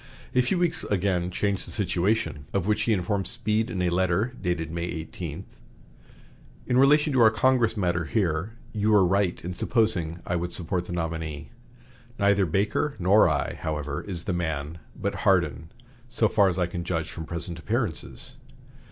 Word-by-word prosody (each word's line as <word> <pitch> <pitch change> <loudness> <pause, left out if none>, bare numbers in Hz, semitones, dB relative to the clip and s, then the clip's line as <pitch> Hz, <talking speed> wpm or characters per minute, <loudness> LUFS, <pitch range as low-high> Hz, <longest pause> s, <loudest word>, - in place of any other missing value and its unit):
A 125 - +4
few 125 +9 0
weeks 175 -2 0
again 90 -3 0
changed 100 +1 -1
the - - -8
situation, 90 -6 -1
of 95 -3 0
which 105 +1 +1
he 115 - +1
informed 95 0 0
Speed 110 -1 0
in 90 -5 -2
a 90 - +1
letter 95 +6 +1
dated 85 -3 -2
May 85 0 -3
18: 80 +1 -6 1.2
"In 125 - +1
relation 150 +2 +5
to 130 - +2
our 110 - +8
Congress 115 0 +2
matter 85 -4 0
here, 90 +1 -1 0.2
you 105 0 0
were 100 -3 +6
right 95 0 +1
in 90 - -3
supposing 90 -7 0
I 90 - -1
would 85 +1 -3
support 90 0 0
the - - -8
nominee. 80 -4 -4 0.7
Neither 100 -1 +3
Baker 105 - 0
nor 95 +1 +5
I, 75 -2 -1
however, 75 -2 -3
is 90 -4 -3
the 95 - -2
man 80 -2 -3 0.2
but - - -1
Hardin, 80 - +1 0.4
so 115 -2 +2
far 100 -2 +4
as 90 - -2
I 90 - +2
can 85 0 -5
judge 85 -2 -2
from 80 - -6
present 85 +1 -5
appearances. 75 - -4
90 Hz, 170 wpm, -26 LUFS, 85-105 Hz, 1.2 s, our